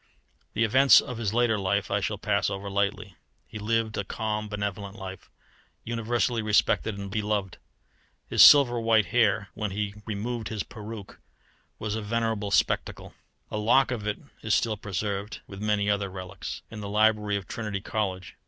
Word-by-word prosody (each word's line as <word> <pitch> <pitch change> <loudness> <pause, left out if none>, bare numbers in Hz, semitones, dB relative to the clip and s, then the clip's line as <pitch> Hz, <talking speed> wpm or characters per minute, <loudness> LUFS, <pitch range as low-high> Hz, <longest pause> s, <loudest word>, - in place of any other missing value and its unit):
The 115 - +1
events 130 +5 +7
of 125 -2 -5
his 105 -4 -1
later 115 -2 +2
life 100 +1 0
I - - +2
shall - - -2
pass - - 0
over 100 +1 -5
lightly. 100 -2 -1 0.3
He 105 - -9
lived 110 0 0
a - - -1
calm, 105 +1 -3
benevolent 100 -1 -4
life, 95 -3 -9 0.5
universally 115 +1 0
respected 105 0 +2
and 100 -1 -6
beloved. 105 -3 -2 0.7
His - - +2
silver 125 -5 +8
white 115 -2 +3
hair 105 -1 +2
when 105 -1 -3
he 100 +1 -3
removed 110 +2 -3
his 110 -3 -3
peruke 105 -1 -9 0.6
was 105 -1 -3
a 110 - -2
venerable 110 -1 -1
spectacle. - - 0 0.4
A 105 - -2
lock 120 +5 +4
of 110 -4 -3
it 105 - -1 0.2
is 110 - +2
still 110 -2 +1
preserved, 100 +1 -4
with 100 0 -10
many 105 -1 +1
other 100 -1 0
relics, 95 -2 -7
in 110 - -7
the 100 - -5
library 105 0 +2
of 100 - -7
Trinity 105 -3 -4
College. 95 -2 -3
105 Hz, 165 wpm, -27 LUFS, 100-110 Hz, 0.7 s, silver